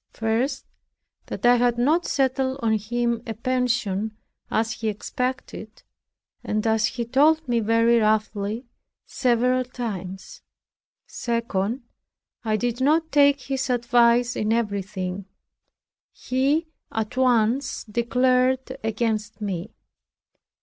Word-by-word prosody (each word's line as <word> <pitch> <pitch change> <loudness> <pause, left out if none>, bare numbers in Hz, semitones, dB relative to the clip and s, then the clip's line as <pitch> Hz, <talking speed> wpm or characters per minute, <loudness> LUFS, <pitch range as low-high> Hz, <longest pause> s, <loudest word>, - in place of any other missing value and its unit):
First, 230 +5 -1 0.6
that - - -4
I 245 0 +6
had 240 0 +2
not 305 +8 +2
settled 265 -1 0
on 220 -1 +2
him 235 +2 -1
a 225 - -4
pension, 235 -4 -1 0.3
as 225 0 0
he 220 0 -4
expected, 240 +1 -4 0.6
and 215 +1 -1
as 220 -1 +3
he 235 - -4
told 300 +6 +3
me 240 -1 +2
very 230 +1 +3
roughly 215 +1 0 0.4
several 250 0 +1
times. 225 - -6 0.6
Second, 230 0 -2 0.6
I 215 -2 +1
did 240 +2 -2
not 315 +4 +2
take 285 -1 +4
his 265 0 -3
advice 240 0 +3
in 215 +1 -1
everything. 200 -4 -2 0.9
He 275 +6 0 0.3
at 220 +2 -3
once 250 0 +2
declared 255 +3 +1
against 220 -1 -2
me. 190 -4 -4
235 Hz, 110 wpm, -24 LUFS, 215-255 Hz, 0.9 s, I